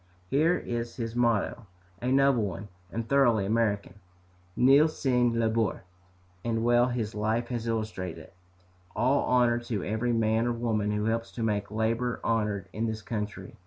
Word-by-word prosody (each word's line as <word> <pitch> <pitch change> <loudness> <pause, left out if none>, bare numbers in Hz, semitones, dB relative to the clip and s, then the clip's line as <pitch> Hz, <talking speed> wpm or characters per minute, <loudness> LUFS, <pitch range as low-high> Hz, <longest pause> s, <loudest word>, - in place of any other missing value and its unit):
Here 160 +6 +3
is 120 0 -4
his 115 -1 -4
motto, 115 -2 0 0.3
a 125 +1 -1
noble 135 -2 +4
one, 100 0 -4 0.2
and 115 0 -4
thoroughly 120 -7 +3
American, 105 -1 0 0.6
"Nihil 140 +5 +6
sine 125 -6 +1
labore," 110 -3 0 0.6
and 115 -1 -1
well 120 +1 +4
his 115 -3 -3
life 110 +3 -1
has 120 -2 -3
illustrated 110 -6 -3
it. 80 - -16 0.6
All 130 +4 +2
honor 120 -1 +3
to 115 -5 -4
every 110 +4 -1
man 115 0 +1
or 120 - +1
woman 110 -3 -1
who 105 0 -1
helps 115 +1 -1
to 115 - -4
make 105 -2 -1
labor 115 +3 -1
honored 105 -4 0
in 115 +2 -1
this 110 -1 -4
country. 105 -4 -5
115 Hz, 160 wpm, -28 LUFS, 110-120 Hz, 0.6 s, Nihil